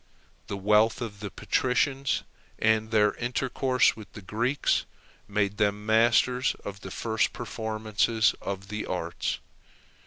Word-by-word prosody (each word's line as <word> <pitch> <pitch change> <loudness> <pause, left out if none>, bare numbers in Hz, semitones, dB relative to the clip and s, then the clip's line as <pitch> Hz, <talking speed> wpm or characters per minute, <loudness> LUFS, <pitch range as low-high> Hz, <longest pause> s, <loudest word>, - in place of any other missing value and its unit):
The 100 - -4
wealth 105 +3 +3
of 110 -4 -6
the 105 -1 -5
patricians, 130 +4 0 0.3
and 110 0 +2
their 105 -2 +3
intercourse 125 +1 +1
with 110 -2 -12
the 105 - -10
Greeks, 120 +9 0 0.4
made 100 0 0
them 105 -1 0
masters 120 +3 +3
of 100 -1 -6
the - - -7
first 110 -1 0
performances 110 -1 0
of 100 0 -5
the 105 0 -4
arts. 85 -2 -2
110 Hz, 125 wpm, -27 LUFS, 105-120 Hz, 0.4 s, wealth